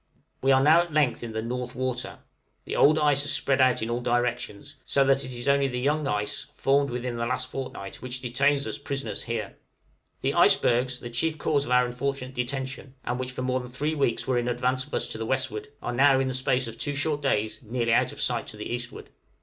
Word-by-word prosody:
We 135 Hz, -, +3 dB
are 135 Hz, 0 st, +5 dB
now 160 Hz, +4 st, +7 dB
at 175 Hz, -1 st, -5 dB
length 150 Hz, -5 st, +2 dB
in 115 Hz, -, -5 dB
the 110 Hz, 0 st, -2 dB
"North 125 Hz, +1 st, -4 dB
Water;" 130 Hz, -1 st, -3 dB, 0.5 s
the -, -, -3 dB
old 155 Hz, +2 st, +5 dB
ice 145 Hz, -2 st, +3 dB
has 145 Hz, +1 st, -1 dB
spread 140 Hz, -2 st, +2 dB
out 130 Hz, -3 st, +3 dB
in 110 Hz, -, -3 dB
all 120 Hz, +1 st, -1 dB
directions, 120 Hz, +2 st, -2 dB
so 140 Hz, -, +2 dB
that 135 Hz, 0 st, +3 dB
it 130 Hz, -, -6 dB
is 120 Hz, +1 st, -6 dB
only 140 Hz, 0 st, +4 dB
the 125 Hz, -2 st, -3 dB
young 145 Hz, +3 st, +1 dB
ice 105 Hz, -1 st, -2 dB
formed 140 Hz, +1 st, +2 dB
within 125 Hz, 0 st, -3 dB
the 115 Hz, 0 st, -1 dB
last 130 Hz, +1 st, -2 dB
fortnight 130 Hz, -7 st, -6 dB
which 125 Hz, 0 st, -4 dB
detains 140 Hz, +3 st, +1 dB
us -, -, -4 dB
prisoners 140 Hz, 0 st, -3 dB
here. 115 Hz, -4 st, -4 dB, 0.6 s
The -, -, 0 dB
icebergs, 125 Hz, +1 st, +3 dB
the 120 Hz, -, -7 dB
chief 155 Hz, +7 st, 0 dB
cause 145 Hz, -2 st, +1 dB
of 125 Hz, -, -6 dB
our 125 Hz, 0 st, +5 dB
unfortunate 130 Hz, +1 st, -3 dB
detention, 130 Hz, +1 st, -4 dB
and 125 Hz, +1 st, -2 dB
which 130 Hz, 0 st, -3 dB
for 130 Hz, -, -4 dB
more 130 Hz, 0 st, +1 dB
than 125 Hz, -1 st, -8 dB
three 150 Hz, +5 st, -1 dB
weeks 140 Hz, -6 st, 0 dB
were 130 Hz, -2 st, +1 dB
in 120 Hz, -, -2 dB
advance 125 Hz, +2 st, 0 dB
of -, -, -19 dB
us -, -, -1 dB
to -, -, -4 dB
the 115 Hz, -, -2 dB
westward, 420 Hz, -, -2 dB, 0.2 s
are -, -, -2 dB
now, 135 Hz, +1 st, +5 dB
in 135 Hz, -, +1 dB
the 130 Hz, -, -2 dB
short 130 Hz, 0 st, +1 dB
space -, -, -6 dB
of 115 Hz, 0 st, -9 dB
two 145 Hz, +1 st, 0 dB
days, 110 Hz, -6 st, 0 dB
nearly 115 Hz, 0 st, 0 dB
out -, -, +3 dB
of -, -, -11 dB
sight -, -, 0 dB
to 105 Hz, -, -9 dB
the 105 Hz, +2 st, -5 dB
eastward. 120 Hz, 0 st, -6 dB
130 Hz, 235 wpm, -27 LUFS, 120-140 Hz, 0.6 s, now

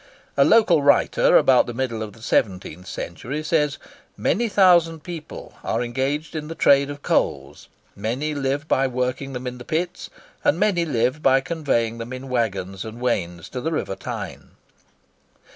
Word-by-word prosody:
A -, -, +5 dB
local 200 Hz, -9 st, +5 dB
writer 140 Hz, 0 st, +4 dB
about 130 Hz, -2 st, +4 dB
the 120 Hz, -, -5 dB
middle 120 Hz, -3 st, -2 dB
of 110 Hz, -1 st, -5 dB
the 115 Hz, -, -16 dB
seventeenth 90 Hz, -5 st, -1 dB
century 145 Hz, +6 st, -5 dB
says, 150 Hz, -3 st, +1 dB, 0.4 s
"Many 235 Hz, +2 st, +1 dB
thousand 170 Hz, -5 st, +4 dB
people 170 Hz, -4 st, -8 dB
are 115 Hz, +2 st, -1 dB
engaged 135 Hz, +7 st, -2 dB
in 150 Hz, -1 st, -4 dB
this 165 Hz, -, -7 dB
trade 140 Hz, 0 st, +4 dB
of 145 Hz, 0 st, -8 dB
coals; -, -, -1 dB, 0.3 s
many 125 Hz, +9 st, -2 dB
live 140 Hz, +1 st, -2 dB
by 135 Hz, -2 st, +2 dB
working 125 Hz, +1 st, -2 dB
of -, -, -8 dB
them 125 Hz, +1 st, -5 dB
in 125 Hz, 0 st, -5 dB
the -, -, -8 dB
pits; 170 Hz, +5 st, -3 dB, 0.3 s
and 155 Hz, -, +3 dB
many 185 Hz, -4 st, +2 dB
live 130 Hz, 0 st, 0 dB
by 135 Hz, -1 st, +5 dB
conveying 135 Hz, -7 st, -1 dB
them 115 Hz, +2 st, -6 dB
in 130 Hz, +1 st, -7 dB
waggons 95 Hz, -6 st, -2 dB
and 110 Hz, +1 st, -8 dB
wains 85 Hz, -8 st, -2 dB
to 125 Hz, -, -5 dB
the 160 Hz, -, -2 dB
river 150 Hz, -10 st, -2 dB
Tyne." -, -, -7 dB
135 Hz, 170 wpm, -23 LUFS, 115-155 Hz, 0.4 s, A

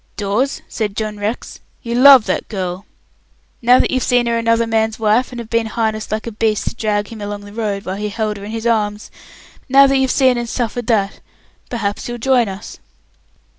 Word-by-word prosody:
"Dawes," 215 Hz, +7 st, -1 dB
said 210 Hz, -3 st, -3 dB
John 215 Hz, 0 st, -4 dB
Rex, 210 Hz, +4 st, -4 dB, 0.2 s
"you 235 Hz, -, -4 dB
love 260 Hz, -1 st, +8 dB
that -, -, -2 dB
girl! 185 Hz, -1 st, -5 dB, 0.7 s
Now 245 Hz, +1 st, +6 dB
that -, -, +1 dB
you've 260 Hz, -, 0 dB
seen 245 Hz, -1 st, +2 dB
her 235 Hz, 0 st, 0 dB
another 230 Hz, 0 st, +2 dB
man's 220 Hz, -1 st, 0 dB
wife, 225 Hz, +4 st, +1 dB
and 245 Hz, -, -8 dB
have 235 Hz, -1 st, -8 dB
been 230 Hz, -1 st, +1 dB
harnessed 220 Hz, -1 st, -2 dB
like 215 Hz, 0 st, -2 dB
a 230 Hz, -, -4 dB
beast 215 Hz, 0 st, -1 dB
to -, -, -1 dB
drag 210 Hz, -3 st, -1 dB
him 225 Hz, -2 st, -9 dB
along 205 Hz, 0 st, -5 dB
the 205 Hz, 0 st, -12 dB
road, 210 Hz, -3 st, -3 dB
while 190 Hz, +1 st, -4 dB
he 210 Hz, +1 st, -3 dB
held 210 Hz, 0 st, -2 dB
her 200 Hz, -, -10 dB
in 205 Hz, -, -7 dB
his 225 Hz, +1 st, -5 dB
arms! 210 Hz, -2 st, -1 dB, 0.6 s
now 275 Hz, +1 st, +7 dB
that 275 Hz, 0 st, +3 dB
you've 265 Hz, -1 st, +1 dB
seen 255 Hz, -3 st, +3 dB
and 235 Hz, -1 st, -4 dB
suffered 240 Hz, -1 st, -3 dB
that, 205 Hz, -4 st, 0 dB, 0.5 s
perhaps 210 Hz, -2 st, -3 dB
you'll 240 Hz, -, -4 dB
join 245 Hz, -2 st, +2 dB
us." 195 Hz, +2 st, -9 dB
225 Hz, 210 wpm, -18 LUFS, 210-240 Hz, 0.7 s, love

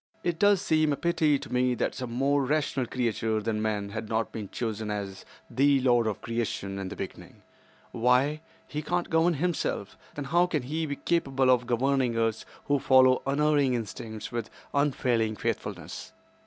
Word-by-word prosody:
"It 170 Hz, -2 st, -1 dB
does 205 Hz, -2 st, +4 dB
seem 155 Hz, -1 st, +2 dB
a -, -, +1 dB
pity, 155 Hz, -3 st, +2 dB
to -, -, -9 dB
me, 125 Hz, 0 st, +2 dB
that -, -, -1 dB
some 125 Hz, -2 st, -5 dB
more 140 Hz, +3 st, +2 dB
rational 140 Hz, -2 st, 0 dB
creature 115 Hz, -3 st, -1 dB
than 105 Hz, 0 st, -2 dB
man 105 Hz, -2 st, -1 dB
had 110 Hz, +1 st, -5 dB
not 110 Hz, 0 st, -1 dB
been 105 Hz, -3 st, -6 dB
chosen 110 Hz, -2 st, -3 dB
as 100 Hz, -2 st, -5 dB, 0.2 s
'The 140 Hz, +1 st, +3 dB
lord 120 Hz, -3 st, +3 dB
of 105 Hz, -, -3 dB
creation' 110 Hz, -4 st, -3 dB
in 95 Hz, -1 st, -4 dB
the -, -, -7 dB
beginning. -, -, -8 dB, 0.5 s
Why, 125 Hz, +6 st, +2 dB, 0.3 s
he 150 Hz, -, -4 dB
cannot 175 Hz, +3 st, -2 dB
govern 165 Hz, +1 st, +3 dB
himself. 150 Hz, -, -2 dB, 0.2 s
Then 145 Hz, -, -4 dB
how 175 Hz, +5 st, +3 dB
can 155 Hz, -7 st, -1 dB
he 155 Hz, +5 st, -2 dB
be 145 Hz, -, -3 dB
capable 135 Hz, -5 st, +1 dB
of 125 Hz, -1 st, +2 dB
governing 125 Hz, -1 st, +1 dB
us 115 Hz, -1 st, 0 dB, 0.2 s
who 145 Hz, -1 st, +2 dB
follow 130 Hz, -1 st, +5 dB
unerring 145 Hz, -2 st, +2 dB
instincts 110 Hz, -1 st, -6 dB
with 120 Hz, -2 st, -3 dB, 0.2 s
unfailing 125 Hz, -6 st, +1 dB
faithfulness? -, -, -4 dB
130 Hz, 170 wpm, -28 LUFS, 115-145 Hz, 0.5 s, follow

